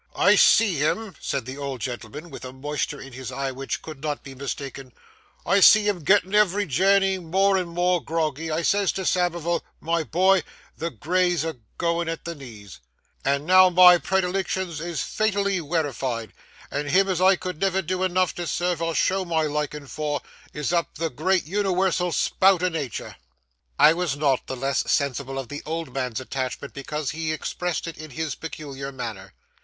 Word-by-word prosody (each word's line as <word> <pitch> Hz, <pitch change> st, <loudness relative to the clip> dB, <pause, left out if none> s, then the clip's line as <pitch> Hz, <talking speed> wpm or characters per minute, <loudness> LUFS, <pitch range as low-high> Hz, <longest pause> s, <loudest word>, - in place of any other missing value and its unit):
I -, -, +5 dB
see 210 Hz, -7 st, +5 dB
him,' 190 Hz, +8 st, -1 dB
said 135 Hz, -4 st, -2 dB
the 130 Hz, +3 st, -7 dB
old 140 Hz, -2 st, -4 dB
gentleman, 125 Hz, +6 st, -6 dB
with -, -, -9 dB
a 130 Hz, -, -6 dB
moisture 145 Hz, +2 st, -3 dB
in 135 Hz, -1 st, -10 dB
his 130 Hz, 0 st, -7 dB
eye, 135 Hz, +1 st, -3 dB
which 135 Hz, +1 st, -5 dB
could 155 Hz, -4 st, -9 dB
not 150 Hz, -2 st, -3 dB
be 135 Hz, -, -9 dB
mistaken,—'I 135 Hz, +7 st, -4 dB
see 210 Hz, +2 st, +7 dB
him 190 Hz, -6 st, -1 dB
gettin', 190 Hz, +3 st, +3 dB
every 205 Hz, -1 st, +3 dB
journey, 195 Hz, +5 st, +3 dB
more 190 Hz, +3 st, +2 dB
and 180 Hz, -2 st, -1 dB
more 175 Hz, 0 st, +1 dB
groggy; 160 Hz, -1 st, -2 dB
I 160 Hz, +2 st, -1 dB
says 200 Hz, 0 st, +2 dB
to 190 Hz, -, -4 dB
Samivel, 175 Hz, -1 st, 0 dB, 0.2 s
"My 165 Hz, +1 st, 0 dB
boy! 185 Hz, +4 st, +3 dB, 0.3 s
the 165 Hz, +2 st, -3 dB
Grey's 175 Hz, -, 0 dB
a 160 Hz, -4 st, -4 dB, 0.2 s
goin' 170 Hz, -1 st, 0 dB
at 165 Hz, -, -5 dB
the 170 Hz, -, -4 dB
knees;" 110 Hz, -, -12 dB, 0.4 s
and 140 Hz, +1 st, 0 dB
now 185 Hz, +1 st, +7 dB
my 180 Hz, 0 st, +8 dB
predilictions 190 Hz, -2 st, -1 dB
is 170 Hz, -1 st, -3 dB
fatally 200 Hz, -3 st, 0 dB
werified, 135 Hz, -, -2 dB, 0.4 s
and 145 Hz, +1 st, -2 dB
him 195 Hz, +5 st, +4 dB
as 185 Hz, -2 st, -1 dB
I 190 Hz, +1 st, +6 dB
could 180 Hz, -3 st, -6 dB
never 190 Hz, -1 st, +1 dB
do 185 Hz, +2 st, -2 dB
enough 185 Hz, -1 st, +1 dB
to 175 Hz, -1 st, -3 dB
serve 175 Hz, +2 st, -1 dB
or 165 Hz, -1 st, -1 dB
show 190 Hz, +1 st, +2 dB
my 165 Hz, -3 st, 0 dB
likin' 150 Hz, -1 st, -3 dB
for, 145 Hz, +1 st, -3 dB, 0.3 s
is 150 Hz, +3 st, -3 dB
up 170 Hz, -1 st, 0 dB
the 165 Hz, -1 st, -2 dB
great 185 Hz, -1 st, +1 dB
uniwersal 185 Hz, -1 st, +1 dB
spout 185 Hz, +4 st, +3 dB
o' 185 Hz, -, +3 dB
natur'.' 150 Hz, -, -5 dB, 0.6 s
I 155 Hz, -, +7 dB
was 170 Hz, -5 st, -1 dB
not 140 Hz, -3 st, +1 dB
the 130 Hz, -, -4 dB
less 135 Hz, +2 st, -1 dB
sensible 135 Hz, -1 st, -1 dB
of 135 Hz, -3 st, -5 dB
the 145 Hz, -, -6 dB
old 160 Hz, -4 st, -4 dB
man's 125 Hz, -4 st, -2 dB
attachment 130 Hz, +1 st, -4 dB
because 145 Hz, +1 st, -4 dB
he 160 Hz, +1 st, -3 dB
expressed 175 Hz, +2 st, -3 dB
it 165 Hz, -3 st, -7 dB
in 155 Hz, 0 st, -8 dB
his 155 Hz, +2 st, -3 dB
peculiar 140 Hz, -4 st, -7 dB
manner. 110 Hz, -8 st, -7 dB
165 Hz, 180 wpm, -24 LUFS, 140-185 Hz, 0.6 s, my